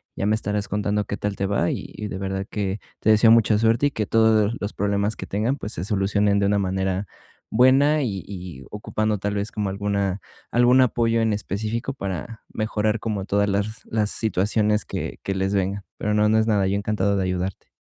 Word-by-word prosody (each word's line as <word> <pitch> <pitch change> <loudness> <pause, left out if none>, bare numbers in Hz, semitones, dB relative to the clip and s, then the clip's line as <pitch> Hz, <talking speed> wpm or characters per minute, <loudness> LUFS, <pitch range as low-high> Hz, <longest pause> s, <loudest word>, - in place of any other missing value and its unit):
Ya 100 - -1
me 110 - +3
estarás 105 -1 -2
contando 105 0 -1
qué 100 - -4
tal 105 -1 -2
te 100 0 -1
va 95 -4 +1
y - - -5
y 105 - -5
de 95 - -4
verdad 95 0 -3
que 100 -1 -3 0.2
te 110 - +1
deseo 110 +1 +6
mucha 110 -2 +5
suerte 115 +5 +3
y - - -3
que 110 -5 -2
todos 110 -1 +3
los 100 - -4
problemas 100 +1 0
que - - -7
tengan, 110 +7 0
pues, 105 -2 -5
se 80 - -4
solucionen 100 +1 +1
de 100 - +2
una 100 0 +2
manera 95 0 -1 0.4
buena 135 +6 +4
y 100 -6 -3
y 90 -8 -8
ocupando, 105 0 -2
tal 105 +1 -2
vez, 100 +2 -2
como 105 -2 -1
alguna 100 -1 -1 0.3
algún 125 +2 +5
apoyo 115 -2 +2
en 110 -1 +2
específico 110 +6 -3
para 100 - -6
mejorar 110 0 -1
como 105 -4 -3
todas 100 0 +1
las 100 +3 -2
las 105 -2 0
situaciones 105 +1 +1
que - - -5
que 95 - -1
les 95 +1 0
vengan. 100 0 -1
Pero 105 - -1
no, 105 0 +3
no 110 +1 +4
es 110 - +1
nada, 100 -3 +2
yo 95 - 0
encantado 100 -1 0
de 95 - 0
ayudarte. 90 +1 -3
105 Hz, 210 wpm, -23 LUFS, 100-110 Hz, 0.4 s, deseo